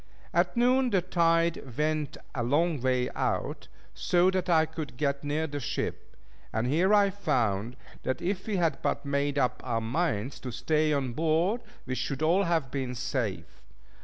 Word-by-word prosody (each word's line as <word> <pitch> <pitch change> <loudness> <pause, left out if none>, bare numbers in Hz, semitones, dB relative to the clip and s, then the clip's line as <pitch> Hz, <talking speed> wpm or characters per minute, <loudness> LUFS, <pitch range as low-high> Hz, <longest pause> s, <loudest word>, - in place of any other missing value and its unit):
At - - +2
noon, 250 +2 +4
the 190 -5 +2
tide 165 -7 +1
went 155 -1 0 0.2
a 125 - -2
long 145 +4 +1
way 125 -1 +1
out, - - -2 0.3
so 180 +1 +3
that 185 -1 -1
I 160 -2 +5
could 155 -6 -7
get 140 0 -1
near 150 +2 0
the 145 -2 -4
ship; 125 - -4 0.4
and 110 +1 -1
here 165 +10 +2
I 205 -1 +5
found 120 - 0 0.3
that 130 - -2
if 190 +2 -2
we 215 - 0
had 165 -5 +1
but - - -1
made 140 0 0
up 125 -3 +1
our 120 -3 0
minds 130 0 -1
to 125 - -6
stay 155 +5 +1
on 135 -4 0
board, 165 - +1 0.2
we 130 - -3
should 135 +3 -2
all 180 +5 +3
have 165 -6 0
been 130 -2 -3
safe. 120 -9 -3
150 Hz, 170 wpm, -28 LUFS, 130-170 Hz, 0.4 s, I